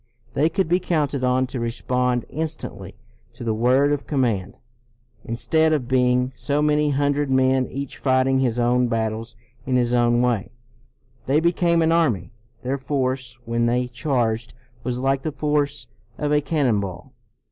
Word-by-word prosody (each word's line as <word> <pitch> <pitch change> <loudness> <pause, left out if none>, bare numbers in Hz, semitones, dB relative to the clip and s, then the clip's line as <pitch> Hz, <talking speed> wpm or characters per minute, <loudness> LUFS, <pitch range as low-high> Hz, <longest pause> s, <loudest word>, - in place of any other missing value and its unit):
They 150 +4 +2
could 190 +2 0
be 175 +3 +2
counted 150 -7 -1
on 130 +1 +2
to 130 0 -5
respond 125 +1 -1
instantly 160 0 -5 0.4
to 120 +1 -9
the 115 -1 0
word 130 +6 +3
of 145 -1 -4
command. 120 -10 -1 0.7
Instead 160 +7 +1
of 135 -6 -1
being 125 0 +2
so 145 0 -1
many 150 0 +2
hundred 145 0 +1
men 130 0 +3
each 140 0 -6
fighting 130 0 +2
his 125 -3 0
own 125 +1 +2
battles 110 -1 -2 0.3
in 130 0 -1
his 120 -1 +2
own 120 -1 +3
way, 120 -5 0 0.8
they 140 +3 +3
became 170 0 +2
an 160 - +2
army. 130 - +1 0.3
Their 135 +2 -2
force 130 -3 -2
when 115 0 0
they 125 +1 +1
charged 120 -3 -1 0.3
was 125 0 -2
like 135 +1 +1
the 155 - -3
force 145 -2 -1 0.3
of 150 0 -1
a 150 - +3
cannon 140 -8 +1
ball. 100 +7 -7
130 Hz, 160 wpm, -23 LUFS, 120-145 Hz, 0.8 s, word